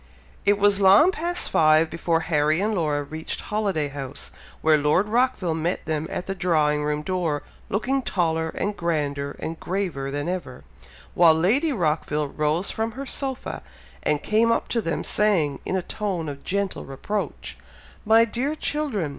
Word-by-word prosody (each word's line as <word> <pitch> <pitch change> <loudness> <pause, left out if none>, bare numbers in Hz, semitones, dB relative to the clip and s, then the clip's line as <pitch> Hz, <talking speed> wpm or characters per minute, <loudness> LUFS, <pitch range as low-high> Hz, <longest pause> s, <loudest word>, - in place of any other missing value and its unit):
It 205 0 +4
was 205 0 +3
long 200 - +7
past 350 0 -2
five 155 0 +4
before 165 -1 0
Harry 155 -1 +2
and 215 +3 0
Laura 150 -6 0
reached 155 +3 -5
Holiday 200 -8 -1
House, 140 -1 -7 0.3
where 155 -1 +5
Lord 150 +7 +2
Rockville 220 -7 +1
met 165 +3 -2
them 155 0 -2
at - - -4
the 195 - -3
drawing 155 -5 +1
room 150 0 -1
door, 170 -4 -1 0.3
looking 255 +7 0
taller, 165 -7 0
and 205 0 -1
grander, 145 -5 -2
and 160 0 -5
graver 175 -8 -2
than 145 +3 -3
ever, 175 - -4 0.5
while 165 -2 +6
Lady 235 - +2
Rockville 155 - 0
rose 155 +6 -1
from 225 +1 -2
her 275 +2 -6
sofa, 265 -1 -4 0.4
and 150 -1 0
came 225 +2 +3
up - - 0
to 230 - 0
them, 165 -5 -2
saying, 175 -10 +1
in - - -1
a 185 - -1
tone 190 -6 -3
of 140 -1 -7
gentle 200 0 -2
reproach, 200 +10 -4 0.5
"My 225 +1 +5
dear 255 +7 -2
children! 285 - -2
175 Hz, 165 wpm, -24 LUFS, 150-210 Hz, 0.5 s, long